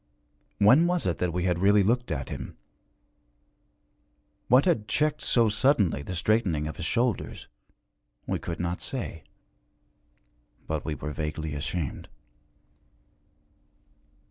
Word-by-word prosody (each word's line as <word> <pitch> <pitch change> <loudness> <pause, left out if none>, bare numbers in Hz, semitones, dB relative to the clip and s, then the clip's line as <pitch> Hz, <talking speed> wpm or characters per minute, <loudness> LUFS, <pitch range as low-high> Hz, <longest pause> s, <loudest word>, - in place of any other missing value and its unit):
When 130 +12 +6
was 180 -1 0
it 90 - -1
that 90 -1 0
we 90 +1 -2
had 90 -2 +1
really 100 +2 +5
looked 120 +5 +1
at 65 -5 -3
him? - - -7 1.9
What 125 +3 +5
had 115 - +1
checked 150 +6 +1
so 115 -2 +3
suddenly 105 - +2
the 90 +6 -6
straightening 90 -5 +1
of 80 - -6
his 85 - -4
shoulders? 120 +3 -1 0.8
We - - -2
could 85 - -5
not 85 0 -2
say. 120 - -5 1.4
But 80 -1 -3
we 80 - -2
were 75 +2 -5
vaguely 75 0 -4
ashamed. 70 +1 -4
90 Hz, 120 wpm, -27 LUFS, 80-120 Hz, 1.9 s, When